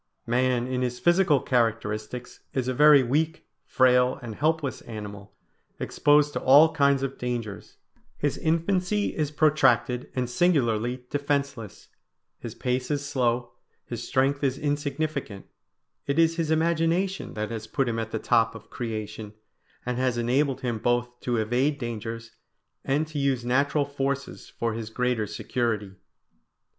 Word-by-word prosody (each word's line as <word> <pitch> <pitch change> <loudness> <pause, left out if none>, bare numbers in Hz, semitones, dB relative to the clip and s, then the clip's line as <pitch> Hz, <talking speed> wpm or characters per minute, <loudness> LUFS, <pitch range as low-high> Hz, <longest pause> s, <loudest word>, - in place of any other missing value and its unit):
Man 125 0 +1
in 130 0 -2
his 125 -1 -1
physical 175 -4 +4
characteristics 115 -1 -2 0.2
is 130 -2 0
a 130 - 0
very 150 0 +7
weak, 155 +6 -1 0.2
frail, 125 0 +4
and 115 -2 -6
helpless 155 +1 -1
animal, 105 -3 -9 0.4
exposed 145 0 +3
to - - -2
all 150 +5 +6
kinds 140 -2 +3
of 135 0 -4
dangers; 115 -6 -5 0.4
his 145 -1 0
infancy 180 +5 0
is 150 -2 0
protracted 135 -5 +2
and 125 -1 0
singularly 125 -5 +1
defenceless; 140 -7 -3 0.5
his - - -7
pace 125 0 -2
is 145 -1 -2
slow, 120 -3 0 0.3
his 120 -2 -6
strength 135 +3 0
is 135 -1 +1
insignificant; 145 -6 -3 0.6
it 140 +1 0
is 165 0 +4
his 165 -2 -1
imagination 170 +4 0
that 110 +1 -3
has 110 -1 -5
put 135 0 0
him 115 -1 -1
at 110 -1 -3
the 110 - -3
top 115 +1 +2
of 115 - -12
creation, 110 -2 -5 0.5
and 125 0 -2
has 130 -2 +1
enabled 130 +3 +1
him 120 -4 -2
both 120 +1 -1
to 120 -1 -1
evade 125 +7 +1
dangers 115 -2 -5 0.5
and 145 +3 +1
to 155 -1 -5
use 135 -3 0
natural 140 +3 +2
forces 140 -1 -4
for 115 -1 -1
his 110 -1 -5
greater 125 -2 -1
security. 105 -1 -2
130 Hz, 145 wpm, -26 LUFS, 115-145 Hz, 0.6 s, very